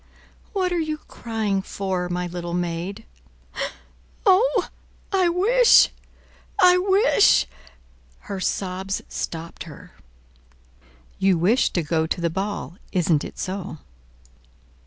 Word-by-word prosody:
"What 370 -3 0
are 345 - +1
you 310 -1 -2
crying 220 -8 -3
for, 190 -2 -3
my 180 0 -2
little 175 0 -4
maid?" 175 +5 -3 1.2
"Oh, 415 +2 +4 0.5
I 370 -2 +3
wish—I 400 -2 +3
wish—" 395 - +4 0.8
Her 195 - -6
sobs 190 +1 -2
stopped 165 0 -5
her. - - -12 1.3
"You 190 -2 +3
wish 205 +10 +3
to 175 - 0
go 160 +1 0
to 165 - -2
the 170 -1 0
ball; 190 -3 -4
isn't 170 -5 +2
it - - -8
so?" 185 -3 -4
195 Hz, 105 wpm, -23 LUFS, -, 1.3 s, Oh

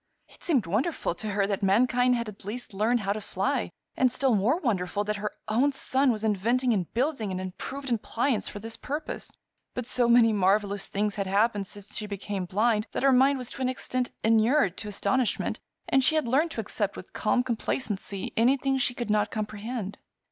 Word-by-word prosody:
It - - -18
seemed 270 - +2
wonderful 220 - 0
to 215 +5 -5
her 200 -1 +1
that 200 -1 -2
mankind 245 +5 +3
had 235 -1 -2
at 210 -1 -10
last 215 +3 -6
learned 220 +4 +1
how 200 0 0
to 215 - -5
fly, - - -1 0.3
and 255 -1 +3
still 265 0 +2
more 220 - +3
wonderful 205 - 0
that 210 0 -2
her 210 0 -3
own 245 +7 +3
son 265 0 +2
was 215 -2 -3
inventing 230 +4 +2
and 185 -5 -2
building 245 -5 0
an 185 - -3
improved 255 +9 -6
appliance 235 +2 0
for - - -8
this 225 +2 -4
purpose; 295 +3 -5 0.4
but 250 - -3
so 245 0 +2
many 235 -2 +6
marvelous 200 0 +1
things 205 +1 -1
had 200 -1 -3
happened 205 0 +1
since 205 +1 -8
she 210 - -3
became 200 -1 -4
blind 215 +3 +1
that - - -2
her 275 -1 +5
mind 270 +2 +5
was 250 -2 -3
to - - -7
an 255 - +1
extent 255 -1 -2
inured 225 - +3
to 215 - -4
astonishment 240 +4 0 0.3
and 270 0 +3
she 315 - +3
had 310 -5 +1
learned 285 +8 +2
to 230 - -3
accept 205 -1 -2
with 185 - -10
calm 230 +4 +1
complacency 215 -5 -3
anything 265 +3 +2
she 250 -1 +1
could 240 -3 -3
not 210 -1 +2
comprehend. 215 0 -4
225 Hz, 200 wpm, -27 LUFS, 205-255 Hz, 0.4 s, many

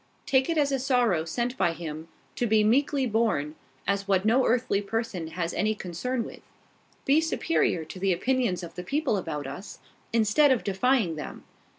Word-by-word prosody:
Take 265 +1 +2
it 330 - 0
as 285 -2 +2
a 270 - +1
sorrow 245 - +2
sent 240 +9 -2
by 170 - +2
Him, 160 -1 -7 0.3
to 240 - 0
be 215 -1 +4
meekly 270 +5 +2
borne, 215 - 0 0.3
as 200 +1 -1
what 190 0 +2
no 245 +4 +4
earthly 230 -4 +1
person 205 -5 -3
has 170 +1 -3
any 215 +1 0
concern 220 +7 -3
with. - - -10 0.6
Be 290 +4 +4
superior 320 - 0
to 175 +4 -9
the 195 0 +1
opinions 220 -1 0
of 170 - -8
the 180 - -6
people 280 - 0
about 160 -6 -3
us, 140 +9 -8 0.3
instead 230 +6 +4
of 255 - +2
defying 200 -3 +1
them. 150 - -7
215 Hz, 180 wpm, -27 LUFS, 175-255 Hz, 0.6 s, be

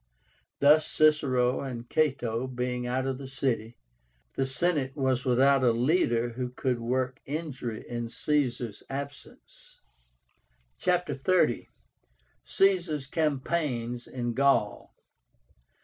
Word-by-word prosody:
Thus, 150 +2 +5
Cicero 135 -5 +3
and 125 -3 -6
Cato 130 -5 0
being 125 -1 -3
out 130 +2 -1
of 135 -1 -2
the 135 - -7
city, 120 -4 -2 0.6
the 135 - -1
Senate 135 -1 0
was 130 -3 0
without 135 +2 +4
a 120 - +5
leader 120 -2 +2
who 125 +1 -4
could 125 0 -2
work 125 +2 -1
injury 135 -7 -5
in 120 -1 -4
Caesar's 125 -6 -1
absence. 140 +1 -9 1.0
CHAPTER 180 0 +1
XXX. 140 -4 +2 0.8
CAESAR'S 175 -7 +2
CAMPAIGNS 135 -6 -1
IN 120 -2 -3
GAUL. 135 -5 +1
130 Hz, 105 wpm, -28 LUFS, 120-145 Hz, 1.0 s, Thus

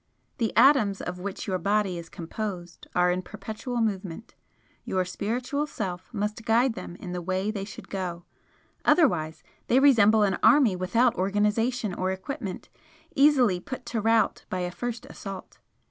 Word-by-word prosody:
The 225 -2 +1
atoms 230 -9 +5
of 180 0 -5
which 195 +1 -5
your 185 -2 -1
body 200 -1 0
is 165 -1 -10
composed 175 0 -6
are 180 0 +4
in 180 +1 -1
perpetual 215 +5 -5
movement, 200 -1 -3 0.5
your 185 -1 -1
Spiritual 245 +10 -2
Self 185 -5 -5
must 210 0 -3
guide 235 +3 +3
them 175 - -8
in 180 -1 -8
the 180 0 -3
way 190 +4 -1
they 200 -2 -4
should 215 - -10
go, 180 -3 -4 0.6
otherwise 170 - +2 0.2
they 255 - +4
resemble 220 -6 +6
an 195 -3 +1
army 270 -10 +5
without 230 +7 +2
organisation 210 +3 0
or 185 +1 -1
equipment, 195 +1 -5 0.5
easily 265 -10 +4
put 255 +5 -7
to 235 -2 -2
rout 225 +1 +2
by 185 - -2
a 180 0 -2
first 240 +4 -5
assault. 195 -2 -9
205 Hz, 155 wpm, -26 LUFS, 185-235 Hz, 0.6 s, resemble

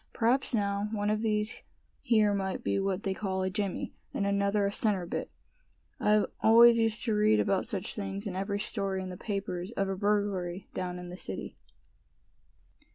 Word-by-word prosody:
"P'raps 245 +4 +2
now, 200 -2 0
one 205 -1 0
of 215 0 0
these 215 -1 -1 0.4
here 215 -3 +3
might 190 -1 -2
be - - +1
what 195 0 -1
they 195 - 0
call 190 -1 -2
a 185 - -1
jimmy, 200 -1 -3 0.2
and 200 - 0
another 200 +1 +2
a 200 - 0
centerbit. 200 -5 -1 0.7
I 210 0 +4 0.2
always 230 +1 +7
used 225 -1 +1
to 225 - 0
read 215 +1 +4
about 200 -1 +1
such 200 -6 -3
things 200 0 -4
in 195 -3 -4
every 200 +2 -2
story 195 -3 -2
in 185 - -6
the - - -6
papers 195 -2 -4
of 195 -3 -1
a 195 - -1
burglary 200 -3 -1
down 180 -1 -3
in 180 0 -8
the 180 - -7
city." - - -6
200 Hz, 175 wpm, -30 LUFS, 190-215 Hz, 0.7 s, always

